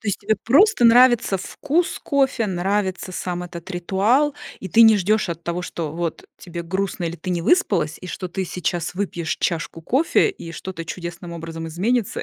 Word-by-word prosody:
То 220 Hz, -, -4 dB
есть 200 Hz, -, -1 dB
тебе 215 Hz, +2 st, +1 dB
просто 320 Hz, -, +4 dB
нравится 240 Hz, -3 st, +6 dB
вкус 325 Hz, -, -1 dB
кофе. 270 Hz, -5 st, +1 dB
Нравится 190 Hz, 0 st, -1 dB
сам 180 Hz, 0 st, -3 dB
этот 175 Hz, +1 st, -9 dB
ритуал, 205 Hz, +11 st, +1 dB, 0.3 s
и 190 Hz, -, -6 dB
ты 225 Hz, +6 st, +6 dB
не 220 Hz, -1 st, +7 dB
ждёшь 205 Hz, +1 st, +1 dB
от 170 Hz, -1 st, -5 dB
того, 170 Hz, +1 st, -2 dB
что 165 Hz, -4 st, -4 dB
вот 170 Hz, 0 st, -4 dB
тебе 170 Hz, -2 st, -7 dB
грустно 190 Hz, +1 st, -2 dB
или 170 Hz, 0 st, -3 dB
ты 185 Hz, -, -5 dB
не 175 Hz, -1 st, 0 dB
выспалась, 180 Hz, -, +2 dB
и -, -, -8 dB
что 185 Hz, -, -5 dB
ты 190 Hz, +2 st, -3 dB
сейчас 175 Hz, -1 st, -3 dB
выпьешь 175 Hz, -4 st, -2 dB
чашку 165 Hz, -1 st, -2 dB
кофе, 270 Hz, -, +2 dB
и 170 Hz, -, -10 dB
что-то 170 Hz, -1 st, -6 dB
чудесным 170 Hz, +1 st, -7 dB
образом 165 Hz, -1 st, -6 dB
изменится, 205 Hz, +7 st, -1 dB
185 Hz, 180 wpm, -22 LUFS, 170-220 Hz, 0.3 s, не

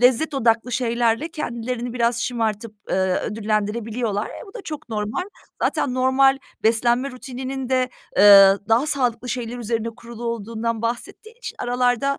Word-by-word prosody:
lezzet 255 Hz, +5 st, +3 dB
odaklı 235 Hz, -1 st, +1 dB
şeylerle 235 Hz, +3 st, +1 dB
kendilerini 245 Hz, -5 st, -4 dB
biraz 235 Hz, -1 st, +1 dB
şımartıp, 225 Hz, -2 st, -2 dB, 0.2 s
ııı, 190 Hz, -1 st, +1 dB
ödüllendirebiliyorlar. 215 Hz, +1 st, -2 dB
E, -, -, -9 dB
bu 390 Hz, -, -15 dB
da 465 Hz, -, -7 dB
çok 305 Hz, -7 st, -7 dB
normal. 215 Hz, +7 st, -2 dB, 0.4 s
Zaten 250 Hz, -, 0 dB
normal 265 Hz, +1 st, +4 dB, 0.2 s
beslenme 240 Hz, +4 st, +2 dB
rutininin 260 Hz, +1 st, -6 dB
de, 255 Hz, -1 st, +2 dB, 0.3 s
eee, 195 Hz, -1 st, +9 dB
daha 230 Hz, +6 st, +3 dB
sağlıklı 250 Hz, -5 st, 0 dB
şeyler 245 Hz, -1 st, -4 dB
üzerine 230 Hz, -1 st, -2 dB
kurulu 235 Hz, 0 st, -9 dB
olduğundan 230 Hz, 0 st, -3 dB
bahsettiği 245 Hz, -, -4 dB
için -, -, -7 dB
aralarda, 245 Hz, +2 st, +1 dB
235 Hz, 140 wpm, -22 LUFS, 225-255 Hz, 0.4 s, eee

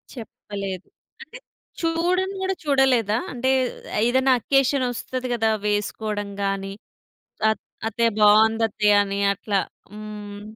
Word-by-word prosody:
చెప్పలేదు. 200 Hz, -4 st, -7 dB, 0.3 s
అంటే 485 Hz, -, -11 dB, 0.4 s
చూడను 355 Hz, +4 st, 0 dB
గూడా 380 Hz, 0 st, -1 dB
చూడలేదా? 255 Hz, -6 st, +3 dB, 0.2 s
అంటే 260 Hz, +1 st, -1 dB, 0.6 s
ఏదైనా 260 Hz, +2 st, +3 dB
అకేషన్ 270 Hz, +1 st, +2 dB
వస్తది 255 Hz, +1 st, -4 dB
గదా! 225 Hz, -2 st, +1 dB, 0.2 s
వేసుకోడం 205 Hz, 0 st, -2 dB
గాని, 195 Hz, 0 st, -2 dB, 0.8 s
అత్ 220 Hz, -, -3 dB, 0.3 s
అత్తయ్య 230 Hz, +1 st, +1 dB
బావుందత్తయ్య 210 Hz, -1 st, +4 dB
అని 200 Hz, 0 st, -3 dB
అట్లా. 200 Hz, 0 st, -1 dB, 0.3 s
హ్మ్. 210 Hz, -1 st, -8 dB
220 Hz, 100 wpm, -23 LUFS, 205-260 Hz, 0.8 s, బావుందత్తయ్య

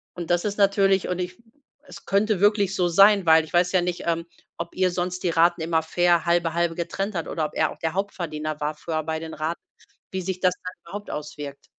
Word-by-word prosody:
Und 175 Hz, -1 st, -4 dB
das 175 Hz, +3 st, +2 dB
ist 205 Hz, 0 st, -2 dB
natürlich 195 Hz, -1 st, +3 dB
und 180 Hz, -, -2 dB
ich 180 Hz, 0 st, -4 dB, 0.5 s
es -, -, -12 dB
könnte 200 Hz, 0 st, +1 dB
wirklich 205 Hz, -2 st, +3 dB
so 180 Hz, -1 st, +2 dB
sein 200 Hz, +2 st, +6 dB
weil 160 Hz, -1 st, +6 dB
ich -, -, -15 dB
weiß 175 Hz, +1 st, +3 dB
ja 185 Hz, -, +4 dB
nicht, 175 Hz, 0 st, -3 dB
ähm, 165 Hz, 0 st, 0 dB, 0.3 s
ob -, -, -6 dB
ihr 185 Hz, -1 st, +2 dB
sonst 180 Hz, +1 st, -3 dB
die 175 Hz, -, +1 dB
Raten 170 Hz, +1 st, +3 dB
immer 160 Hz, 0 st, +1 dB
fair 175 Hz, +1 st, +2 dB
halbe 170 Hz, -1 st, +2 dB
halbe 170 Hz, -1 st, 0 dB
getrennt 195 Hz, +4 st, -3 dB
habt 165 Hz, -, -3 dB
oder 155 Hz, -2 st, -1 dB
ob -, -, -6 dB
er 155 Hz, -, +1 dB
auch -, -, -12 dB
der 160 Hz, 0 st, -2 dB
Hauptverdiener 155 Hz, -6 st, -3 dB
war 150 Hz, +1 st, -1 dB
früher 155 Hz, +1 st, -3 dB
bei 160 Hz, 0 st, -3 dB
den 160 Hz, 0 st, -7 dB
Raten 155 Hz, +3 st, -3 dB, 0.5 s
wie 190 Hz, 0 st, -3 dB
sich 185 Hz, 0 st, -4 dB
das 180 Hz, -1 st, +3 dB
dann 180 Hz, 0 st, -6 dB
überhaupt 205 Hz, +4 st, -8 dB
auswirkt. 145 Hz, -1 st, -7 dB
175 Hz, 230 wpm, -24 LUFS, 160-190 Hz, 0.5 s, sein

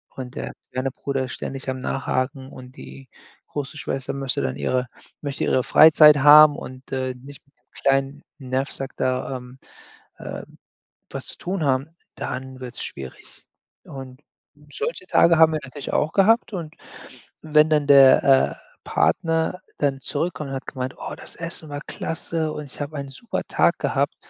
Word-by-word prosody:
und 130 Hz, -1 st, -7 dB
der -, -, -5 dB, 0.2 s
kleine 130 Hz, +1 st, -1 dB
Bruder 135 Hz, 0 st, -3 dB
ständig 135 Hz, +2 st, -6 dB
am 130 Hz, -, -2 dB
Nachhaken 130 Hz, +1 st, -2 dB
und 130 Hz, -1 st, -12 dB
die 135 Hz, -1 st, -12 dB, 0.4 s
große 145 Hz, +1 st, -5 dB
Schwester 135 Hz, -2 st, -4 dB
möchte 135 Hz, -1 st, -2 dB
dann 65 Hz, -, -2 dB
ihre 125 Hz, -, -1 dB, 0.3 s
möchte 140 Hz, -2 st, -3 dB
ihre 130 Hz, -, +2 dB
Freizeit 150 Hz, 0 st, +7 dB
haben 150 Hz, +1 st, +8 dB
und, 130 Hz, +1 st, -10 dB
äh, 130 Hz, -1 st, -1 dB
nicht 135 Hz, +3 st, -13 dB
mit 140 Hz, -, -35 dB
dem -, -, -45 dB
kleinen 135 Hz, +1 st, +1 dB, 0.2 s
Nerv-Sack 135 Hz, 0 st, -3 dB
da, 130 Hz, +1 st, -1 dB
ähm, 125 Hz, +1 st, -13 dB, 0.6 s
äh, -, -, -7 dB, 0.7 s
was -, -, -5 dB
zu -, -, -7 dB
tun 185 Hz, -1 st, -3 dB
haben, 135 Hz, +1 st, +1 dB, 0.3 s
dann 130 Hz, 0 st, -6 dB
wird's 125 Hz, -1 st, -6 dB
schwierig. 65 Hz, -2 st, -10 dB, 0.4 s
Und 135 Hz, 0 st, -10 dB, 0.5 s
solche 235 Hz, -, -4 dB
Tage 170 Hz, -1 st, +5 dB
haben 160 Hz, -1 st, +6 dB
wir 155 Hz, -, 0 dB
natürlich 140 Hz, +1 st, -7 dB
auch 150 Hz, +2 st, +1 dB
gehabt. 220 Hz, +3 st, +3 dB
Und 165 Hz, -5 st, -6 dB, 0.7 s
wenn 155 Hz, 0 st, +4 dB
dann 150 Hz, -2 st, +2 dB
der, 135 Hz, -2 st, +7 dB
äh, 135 Hz, -1 st, +4 dB, 0.3 s
Partner 165 Hz, +2 st, 0 dB, 0.2 s
dann 140 Hz, -2 st, 0 dB
zurückkommt 150 Hz, -1 st, -3 dB
und -, -, -3 dB
hat 135 Hz, -, -6 dB
gemeint: 130 Hz, -1 st, -4 dB
„Oh, -, -, -6 dB
das -, -, -12 dB
Essen 165 Hz, -2 st, -7 dB
war 145 Hz, 0 st, -5 dB
klasse 160 Hz, -1 st, -3 dB
und 150 Hz, -, -6 dB
ich 135 Hz, -, -15 dB
habe 150 Hz, +2 st, -5 dB
ein 140 Hz, -1 st, -5 dB
super 180 Hz, -, -5 dB
Tag -, -, +2 dB
gehabt.“ -, -, 0 dB
135 Hz, 165 wpm, -23 LUFS, 130-155 Hz, 0.7 s, haben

